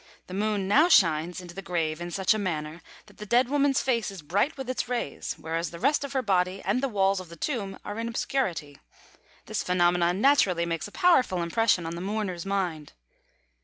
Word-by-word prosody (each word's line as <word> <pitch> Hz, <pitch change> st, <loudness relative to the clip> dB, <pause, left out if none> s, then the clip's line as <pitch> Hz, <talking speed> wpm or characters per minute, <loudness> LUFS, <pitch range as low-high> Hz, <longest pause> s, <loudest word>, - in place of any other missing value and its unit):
The 185 Hz, -, -10 dB
Moon 205 Hz, -1 st, -1 dB
now 300 Hz, -, +5 dB
shines 170 Hz, -, +3 dB
into 175 Hz, -1 st, -10 dB
the 195 Hz, -, -7 dB
grave 165 Hz, -3 st, -2 dB
in 175 Hz, -, -4 dB
such 190 Hz, +4 st, +2 dB
a 215 Hz, -, -2 dB
manner 160 Hz, -4 st, -3 dB, 0.2 s
that 210 Hz, -, -20 dB
the 210 Hz, -, -8 dB
dead 245 Hz, +3 st, +3 dB
woman's 285 Hz, -1 st, +2 dB
face 235 Hz, -5 st, 0 dB
is 195 Hz, -5 st, -9 dB
bright 200 Hz, -, 0 dB
with 265 Hz, -2 st, -6 dB
its 255 Hz, -1 st, -3 dB
rays, 240 Hz, -, -3 dB
whereas 165 Hz, +2 st, -3 dB
the 170 Hz, -, -9 dB
rest 280 Hz, -, +1 dB
of 280 Hz, -, -6 dB
her 265 Hz, -1 st, 0 dB
body 185 Hz, -2 st, +1 dB
and 205 Hz, +7 st, +1 dB
the 275 Hz, -, 0 dB
walls 195 Hz, -3 st, +2 dB
of 185 Hz, -2 st, -10 dB
the 170 Hz, -, -10 dB
tomb 200 Hz, -, -3 dB
are 205 Hz, +2 st, -5 dB
in 230 Hz, -, -2 dB
obscurity. 185 Hz, -, -2 dB, 0.7 s
This -, -, -2 dB
phenomenon 175 Hz, 0 st, +2 dB
naturally 200 Hz, -10 st, +3 dB
makes 165 Hz, -2 st, -3 dB
a -, -, -14 dB
powerful 265 Hz, -, +3 dB
impression 185 Hz, 0 st, +1 dB
on 165 Hz, -, -4 dB
the 170 Hz, -, -6 dB
mourner's 195 Hz, -3 st, -3 dB
mind. 180 Hz, -7 st, -2 dB
195 Hz, 205 wpm, -27 LUFS, 170-235 Hz, 0.7 s, now